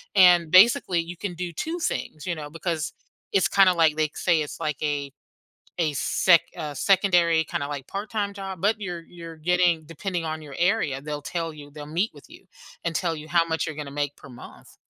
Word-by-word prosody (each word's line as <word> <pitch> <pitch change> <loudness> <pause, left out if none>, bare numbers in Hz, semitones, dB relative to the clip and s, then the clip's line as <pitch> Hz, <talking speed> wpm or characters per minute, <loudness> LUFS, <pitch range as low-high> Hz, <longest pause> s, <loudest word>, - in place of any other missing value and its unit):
and 175 -4 +6
basically 185 -2 +6
you 170 +1 -5
can 190 -1 -4
do 175 0 -5
2 325 - -4
things, 155 - -3
you 170 - -1
know, 150 -1 -7
because 165 -1 -3 0.4
it's 195 -2 +3
kinda, 195 -2 +5
like, 160 -2 +4
they 155 -1 +1
say 170 -3 +2
it's, 150 - -6
like, 150 -2 -2
a 145 -2 -2 0.7
a 155 -3 +1
sec 170 +4 +4 0.2
a 150 -1 -5
secondary 175 -3 +3
kinda, 140 -1 -3
like, 140 -3 -5
part-time 205 0 -3
job, 195 -3 -7
but 210 +1 +1
you're 175 -4 -5
you're 165 -2 -10
getting 175 0 +2
depending 170 +1 -4
on 155 0 -4
your 140 -2 -10
area, 175 -7 +1
they'll 150 0 -5
tell 165 0 -3
you 145 -1 -12
they'll 145 0 -9
meet 175 +8 0
with - - -15
you - - -16 0.4
and 165 -1 -1
tell 170 -3 0
you 155 +1 -9
how 170 -1 +3
much 160 0 -1
you're 155 -2 -5
gonna 145 -2 -6
make 145 0 -3
per 140 - -14
month. 120 - -13
165 Hz, 205 wpm, -25 LUFS, 150-180 Hz, 0.7 s, and